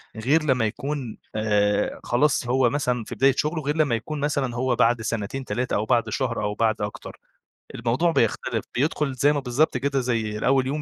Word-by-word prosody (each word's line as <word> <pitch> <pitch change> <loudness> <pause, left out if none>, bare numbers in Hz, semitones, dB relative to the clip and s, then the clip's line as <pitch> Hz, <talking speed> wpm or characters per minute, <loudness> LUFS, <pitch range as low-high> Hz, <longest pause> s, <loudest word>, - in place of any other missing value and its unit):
غير 140 +8 +2
لمّا 125 -6 +2
يكون، 135 +1 -4 0.2
آآ 105 -1 +1
خلاص 130 0 +1
هو 125 -1 +3
مثلًا 125 -4 -1
في - - -8
بداية 135 +1 +4
شُغله، 155 +1 -1
غير 150 +3 -1
لمّا 145 -7 +2
يكون 145 +7 -5
مثلًا 140 -4 -1
هو 125 0 0
بَعد 115 0 +3
سنتين، 115 +4 -3
3 125 +1 -2
أو 105 - 0
بَعد 120 -1 +1
شهر 120 -5 -2
أو 105 0 -1
بَعد 110 -1 +1
أكتر، - - -6 0.6
الموضوع 125 +9 +1
بيختلف 115 -2 0
بيدخُل 140 +1 0
زي 145 +3 +3
ما 145 - 0
بالضبط 135 +2 +1
كده 140 +1 0
زي 115 -4 -1
الأول 130 +3 +2
يوم 150 +2 -2
125 Hz, 190 wpm, -24 LUFS, 115-140 Hz, 0.6 s, بداية